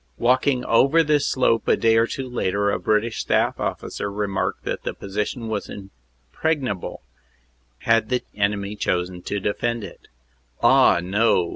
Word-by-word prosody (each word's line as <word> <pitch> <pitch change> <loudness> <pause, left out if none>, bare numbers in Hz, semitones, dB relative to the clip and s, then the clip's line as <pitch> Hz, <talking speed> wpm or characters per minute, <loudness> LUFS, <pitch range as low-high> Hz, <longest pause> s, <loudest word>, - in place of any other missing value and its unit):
Walking 125 +1 +2
over 140 +8 +4
this 150 -2 +2
slope 120 -3 +1
a - - +4
day 115 0 +3
or 115 +1 +3
two 135 +1 -5
later, 100 -4 0
a - - -1
British 110 +2 0
staff - - +1
officer 100 - -4
remarked 100 -1 -2
that - - -3
the - - -4
position 105 +4 -4
was 110 -2 -3
impregnable 95 - -5 0.8
had 115 -1 +2
the 125 -1 0
enemy 100 0 -1
chosen 90 -2 -2
to 100 +3 -3
defend 115 +3 -2
it. 100 - -11 0.6
Ah, 85 - +5
no! 95 -2 +2
105 Hz, 145 wpm, -23 LUFS, 100-120 Hz, 0.8 s, Ah